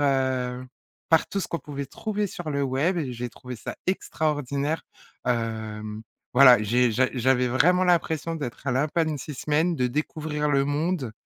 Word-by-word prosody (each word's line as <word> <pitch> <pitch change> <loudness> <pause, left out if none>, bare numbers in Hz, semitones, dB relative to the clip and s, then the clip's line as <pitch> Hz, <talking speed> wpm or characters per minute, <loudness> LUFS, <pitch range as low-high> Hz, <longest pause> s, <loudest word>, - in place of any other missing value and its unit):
heu, 130 -3 0 0.5
par 160 -1 +4
tout 200 - -2
ce - - -4
qu'on 170 - -2
pouvait 140 -3 -6
trouver 210 - -2
sur 175 -4 -6
le 140 -1 0
web 140 +7 +1
et 135 -6 -2
j'ai 120 0 -4
trouvé 125 +1 -9
ça - - -6
extraordinaire, 150 -4 -1 0.4
hem. 110 -2 -2 0.3
Voilà, 125 -3 +8
j'ai 120 +3 +3
j'a 130 +4 +3
j'avais 125 0 +2
vraiment 180 +9 +3
l'impression 165 -2 +1
d'être 140 -4 -6
un 135 - +1
lapin 150 +5 +1
de 155 - -1
6 145 +2 -7
semaines, 155 +6 +1
de 125 - +1
découvrir 150 +2 -2
le 140 -1 +3
monde, 145 -3 -1
140 Hz, 170 wpm, -25 LUFS, 125-160 Hz, 0.5 s, Voilà